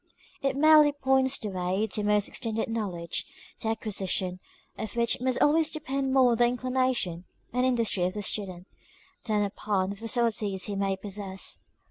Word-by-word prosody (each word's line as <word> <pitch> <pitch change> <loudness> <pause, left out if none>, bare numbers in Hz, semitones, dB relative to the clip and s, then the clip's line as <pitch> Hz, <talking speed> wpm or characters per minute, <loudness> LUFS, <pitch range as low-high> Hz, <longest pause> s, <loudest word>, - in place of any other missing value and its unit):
It 275 -1 0
merely 305 0 +6
points 265 -1 +2
the 215 - -5
way 185 +2 -1
to 210 - -1
more 210 0 +3
extended 220 +2 -1
knowledge, 185 -7 -2 0.4
the - - -3
acquisition 190 -4 -1 0.4
of 220 - -6
which 235 0 +1
must 255 -1 +1
always 315 +1 +3
depend 275 -3 -2
more 260 -2 +5
on 230 - +1
the 240 +1 +5
inclination 250 -8 -1 0.3
and 250 +1 +2
industry 230 -6 +1
of 185 +2 -2
the 210 - -3
student, 185 -4 -1 0.6
than 210 -2 +1
upon 200 -1 -1
the - - -5
facilities 220 -3 0
he 205 - -3
may 195 -1 0
possess. 195 -1 -4
220 Hz, 160 wpm, -28 LUFS, 195-255 Hz, 0.6 s, merely